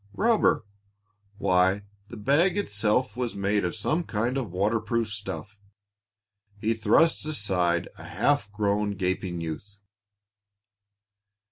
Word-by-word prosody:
Rubber! 220 - +3 0.7
Why, 95 +1 +2 0.2
the - - -9
bag 155 - +3
itself 105 - 0
was 125 -1 -3
made 100 +1 0
of 90 - -2
some 155 - 0
kind 120 -1 -1
of 125 -8 -3
waterproof 110 +3 0
stuff. 105 0 -7 1.0
He 110 +1 +1
thrust 115 +9 +3
aside 90 - 0
a - - -10
half 145 -8 0
grown, 105 0 0
gaping 90 -2 -2
youth. 85 +6 -6
105 Hz, 110 wpm, -26 LUFS, 100-120 Hz, 1.0 s, Rubber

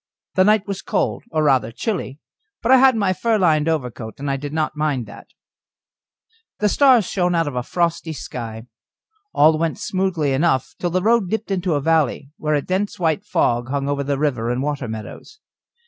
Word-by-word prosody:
The 185 - +4
night 210 0 +3
was 200 -2 -4
cold, - - -1
or 155 -5 0
rather 130 -6 +2
chilly, 165 - -3 0.5
but 235 - +2
I 265 - +8
had 260 -1 +5
my 200 -4 +1
fur 225 +3 +1
lined 160 -5 +2
overcoat, 125 -8 -3
and 135 -1 -2
did 145 -1 -5
not 155 0 -1
mind 150 -5 -1
that. 105 - -13 1.3
The 210 - +1
stars 255 -3 +5
shone 180 -1 0
out 165 -2 +1
of 145 - -4
a 125 - 0
frosty 170 +3 -1
sky. 115 -5 -7 0.7
All 155 +1 +4
went 165 -1 -1
smoothly 185 -7 -1
enough 135 -2 +1
till 175 - -1
the 180 +1 -1
road 225 -3 +3
dipped 220 0 -3
into 180 -4 0
a 145 - 0
valley, 150 -3 +1
where 150 0 0
a 145 - 0
dense 190 +2 -2
white 160 -4 0
fog 120 +1 0
hung 140 0 -2
over 140 0 -1
the 140 0 -1
river 130 -6 -1
and 125 +2 -1
the - - -2
water 145 -4 -3
meadows. 110 - -8
155 Hz, 195 wpm, -21 LUFS, 135-185 Hz, 1.3 s, I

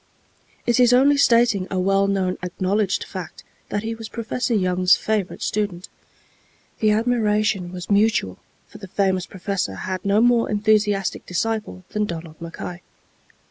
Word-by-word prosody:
It 240 0 +2
is 245 0 +5
only 275 +3 +5
stating 235 -8 +3
a 190 - -2
well 195 +1 +2
known, 190 -2 -1
acknowledged 190 +2 -1
fact, 185 -4 -8 0.3
that 205 - -2
he 225 +1 -3
was 225 -1 -8
Professor 235 +1 -2
Young's 185 -2 +3
favorite 215 -4 -2
student. 200 -4 -2 0.9
The 215 - +3
admiration 210 -4 +1
was 180 -1 -7
mutual, 200 - +2 0.3
for 210 - -13
the 195 - -9
famous 190 -1 0
professor 190 - -3
had 185 - -4
no 200 +1 +2
more 240 0 +3
enthusiastic 210 -2 +1
disciple 215 0 -2
than 210 0 -1
Donald 165 -2 -8
Mackay. 170 +1 -7
200 Hz, 140 wpm, -22 LUFS, 185-220 Hz, 0.9 s, is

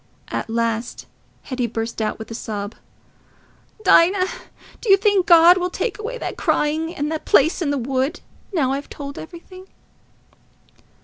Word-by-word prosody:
At - - -4
last 230 0 -2 0.4
Hetty 255 -3 -2
burst 225 0 -4
out, 215 -1 -1
with 220 0 -9
a - - -4
sob, 210 -2 -5 1.1
"Dinah, 370 +1 +5 0.6
do 460 - -4
you 390 - +8
think 400 -2 +2
God 345 +1 +7
will 360 0 -1
take 425 +3 -3
away 465 +4 -5
that - - -5
crying 315 +3 0
and 295 +2 -2
the 315 - -2
place 315 +2 +3
in 315 - 0
the 285 - 0
wood, 265 +6 -1 0.3
now 290 -9 +1
I've 280 +1 -4
told 280 -1 -7
everything?" 370 +3 -11
300 Hz, 150 wpm, -21 LUFS, 245-360 Hz, 1.1 s, you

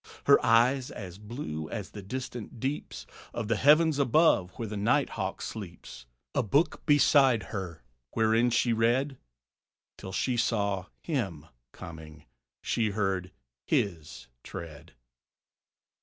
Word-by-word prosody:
Her - - +6
eyes, 125 +3 +4
as 95 -2 -8
blue 105 - -6
as 105 -5 -5
the 105 - -8
distant 125 +2 -6
deeps 135 +5 -4 0.3
Of 115 -3 -3
the 115 - +3
heavens 150 +4 +5
above 140 - +4
where 115 - -3
the 100 -1 -4
high - - +3
hawk - - -4
sleeps; 85 - -8 0.3
A - - +2
book 140 - +1
beside 140 -6 +5
her, 90 - -5 0.3
wherein 115 +2 +3
she 120 0 +2
read 120 +4 +1 0.8
Till 95 - -7
she 120 +6 0
saw 100 -5 0 0.2
him 100 - -2 0.3
coming, 80 -1 -11 0.4
she 110 -2 +1
heard 95 -3 -1 0.4
his 85 -6 -1
tread. 80 -1 -9
110 Hz, 125 wpm, -29 LUFS, 95-130 Hz, 0.8 s, Her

